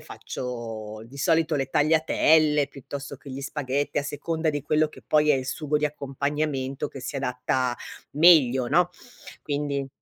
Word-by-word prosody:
faccio, 115 -4 -6
di 140 +4 -12
solito, 165 +1 +2
le 135 - -1
tagliatelle, 155 0 +3
piuttosto 140 +1 -8
che 140 +1 -12
gli 130 +1 -6
spaghetti, 140 0 -2
a - - 0
seconda 160 +3 -2
di 145 -1 -3
quello 150 +1 +2
che - - -15
poi 150 0 +4
è - - +6
il 130 -1 -2
sugo 150 +2 -1
di 150 - 0
accompagnamento 140 -1 -2
che 135 - -9
si 140 - -5
adatta 125 -1 -1 0.4
meglio, 140 -6 +5
no, 175 +5 +3 0.5
quindi 140 -2 -2
140 Hz, 155 wpm, -25 LUFS, 130-150 Hz, 0.5 s, è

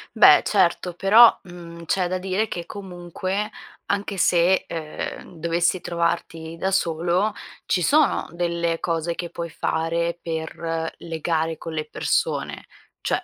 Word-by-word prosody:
Beh, - - +8
certo, 180 -2 +1
però, 215 +6 +7
mhmm, 170 -2 -11
c'è 180 +1 0
da 185 - -1
dire 195 +4 -1
che 170 -1 -5
comunque 190 +2 -4 0.4
anche 200 -1 -2
se, 175 +1 +3
ehm, 160 +1 -6
dovessi 170 +2 +1
trovarti 170 -1 -2
da 190 +1 0
solo 175 +3 +1 0.3
ci 180 - +1
sono 295 - +3
delle 170 -1 -1
cose 170 0 -1
che 175 - -5
puoi 170 0 -5
fare 170 +2 -1
per 165 0 -3
legare 165 -1 -2
con 165 - -7
le 155 -1 -2
persone, - - -1 0.3
cioè - - -1
170 Hz, 130 wpm, -23 LUFS, 165-185 Hz, 0.4 s, Beh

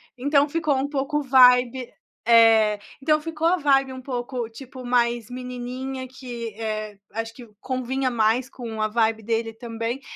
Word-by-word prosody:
Então 285 +3 +2
ficou 310 -1 0
um 270 +2 -1
pouco 290 +1 -1
vibe 250 -1 +5 0.4
É, 225 -2 +6 0.2
então 305 +1 +2
ficou 325 0 -1
a 350 - +4
vibe 270 -5 +2
um 260 - -8
pouco, 245 -2 -4
tipo, 255 +2 -11
mais 240 -2 +1
menininha 255 +1 -5
que, 240 -4 -7
eh, 215 -2 -4
acho 225 0 -4
que 240 0 -12
convinha 260 0 -2
mais 235 +3 +1
com 225 -4 -6
a 215 - +1
vibe 220 0 +1
dele 225 0 -1
também, 230 +2 -5
250 Hz, 155 wpm, -24 LUFS, 230-270 Hz, 0.4 s, É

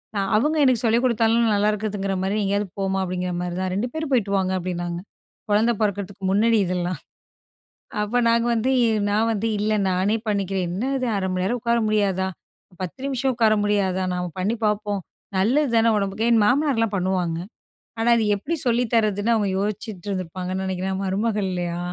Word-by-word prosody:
நா - - 0 0.2
அவங்க 300 +7 +1
எனக்கு 250 -2 +3
சொல்லிக் 230 +2 +3
குடுத்தாலும், 230 0 +3
நல்லாயிருக்குதுங்கிற 205 -1 0
மாரி, 200 +3 0
எங்கேயாவது 200 +1 0
போமா." 195 0 0
அப்படீங்கிற 180 0 -3
மாரி 175 0 -4
தான். 185 -1 -1
"2 235 +5 -1
பேரும் 315 -3 -4
போய்ட்டு 205 -5 +2
வாங்க" 190 -1 0
அப்படீன்னாங்க. 175 -1 -3 0.5
குழந்தை 225 +3 +3
பொறக்கறதுக்கு 200 -1 -2
முன்னடி 220 +2 +3
இதெல்லாம். 180 -3 -2 1.0
அப்ப 210 +4 -2
நாங்க 235 +1 +2
வந்து, 235 +3 +1 0.4
"நான் 220 +2 +2
வந்து 225 +1 -1
இல்ல, 215 +1 +1 0.2
நானே 190 +4 +1
பண்ணிக்கிறேன். 195 -2 -1
என்னது 255 +6 -1
1/2 190 +4 -1
உட்கார 235 0 +2
முடியாதா? 195 -3 +1 0.5
10 185 +7 -6
நிமிஷம் 265 -1 0
உட்கார 225 -2 +3
முடியாதா? 190 -3 +1
நாம 180 -1 -3
பண்ணி 205 +5 0
பாப்போம். 210 -1 -1 0.4
நல்லது 250 +8 +2
தான 225 0 +4
உடம்புக்கு" 200 +3 -1
என் 230 -2 +5
மாமனார்லாம் 250 -5 +2
பண்ணுவாங்க. 180 -3 0 0.6
ஆனா, 235 +1 +2
அது 225 - +1
எப்படி 285 +12 -3
சொல்லி 240 +1 +2
தரதுன்னு 215 0 +2
அவங்க 210 -2 +1
யோசிச்சிட்டு 205 -2 -4
இருந்திருப்பாங்கன்னு 185 0 -3
நெனைக்கிறேன், 190 0 -2
மருமகள் 205 +1 0
இல்லையா? 175 -1 -3
205 Hz, 155 wpm, -23 LUFS, 190-230 Hz, 1.0 s, என்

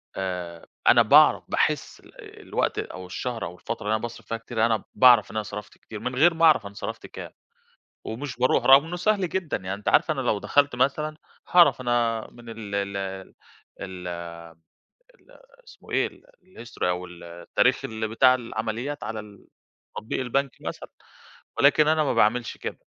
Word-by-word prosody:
آآ 90 -3 -5 0.2
أنا - - +7
باعرف - - +6
باحِس - - -1
ال - - -15
الوقت - - -1
أو 90 0 -7
الشهر 115 +2 -4
أو 85 +2 -8
الفترة - - -6
اللي 105 +1 +1
أنا 110 - -3
باصرف 120 0 -7
فيها 115 - -3
كتير 115 0 -1
أنا 110 -2 0
باعرف 125 -4 +6
إن - - -12
أنا 110 - -1
صرفت 105 0 -9
كتير 110 - -10
من 125 +3 -4
غير 165 +6 +5
ما 165 0 +3
أعرف 155 -9 +5
أنا 100 - -8
صرفت - - -7
كام، - - -9 0.7
ومش 130 +4 -6
باروح 125 +1 +2
رغم 135 +2 +7
إنّه 175 +2 -5
سهل 195 0 +1
جدًا 175 -4 -2
يعني 95 0 -5
أنتِ 100 +1 -5
عارفة 155 - +4
أنا 135 - -3
لو 120 -5 0
دخلت 145 +5 +2
مثلًا، 150 +4 0 0.3
هاعرف 175 -6 +5
أنا 120 -2 0
من 120 -1 -14
ال 110 -3 -7
ال 100 0 -2 0.8
ال 90 -1 -7 1.1
ال - - -25 0.3
إسمه 460 - -16
إيه - - +2
ال - - -13 0.2
الhistory 120 -10 -8
أو 90 0 -2
ال 90 -1 -13
التاريخ 85 0 0
ال 110 0 -3
بتاع 130 +4 +5
العمليات 120 +3 -4
على 110 -1 -4
ال 105 -1 -15 0.5
تطبيق 110 - -4
البنك 135 +2 0
مثلًا، - - -7 0.7
ولكن 150 +2 +5
أنا 155 0 +3
ما 135 - 0
باعملش 115 +1 +1
كده، - - -6
115 Hz, 180 wpm, -25 LUFS, 105-140 Hz, 1.1 s, أنا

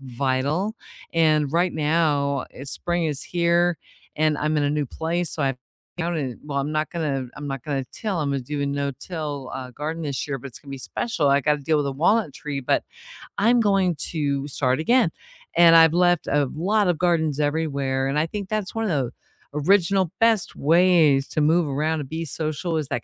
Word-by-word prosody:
vital, 135 - -1 0.4
and 155 -3 +2
right 175 +2 +2
now, 150 -3 +1 0.2
spring 175 +4 -2
is 150 -1 -3
here, 175 0 +2 0.4
and 155 0 +2
I'm 155 +1 0
in 145 - +2
a 145 - +1
new 150 -1 -1
place, 165 +5 -2
so 150 - -3
I 135 -2 0 0.4
found 170 0 -1
it 130 -6 -3
well, 145 -2 -3
I'm 140 +2 -1
not 155 0 -1
gonna 145 -6 -2
I'm 145 - -6
not 135 -3 -4
gonna 140 -3 -2
till. 200 -7 -3
Imma 140 -1 -1
do 145 +3 -4
a - - 0
no-till, 140 0 -4
uh, 130 -1 -6
garden 155 +5 -4
this 140 -3 -3
year, 135 - -2
but 130 - -9
it's 120 - -12
gonna 140 - -13
be 135 - -6
special. 155 - -1
I 140 +1 +4
gotta 150 +2 +1
deal 155 +3 +1
with 145 -1 0
a 135 - -2
walnut 175 +4 +2
tree, 145 0 -5
but 125 - +1 0.5
I'm 235 +3 +4
going 195 -5 +2 0.2
to 140 -3 -1
start 130 -1 0
again, 235 +3 +3 0.5
and 170 -1 +7
I've 165 -1 +7
left 175 0 +3
a 145 0 +2
lot 200 +5 +1
of 175 - +1
gardens 160 -5 +1
everywhere, 140 -3 0
and 135 +2 -1
I 155 - +2
think 200 +2 -6
that's 215 -3 -2
one 225 0 -1
of - - -1
the 135 -6 0 0.4
original 185 +3 +2
best 225 -4 +2
ways 160 -3 +4
to 155 - -1
move 160 +2 +3
around 155 +3 -1
and 135 - -8
be 165 +1 -4
social 160 +2 -2
is 150 -3 -2
that 140 - -2
155 Hz, 200 wpm, -23 LUFS, 140-170 Hz, 0.5 s, and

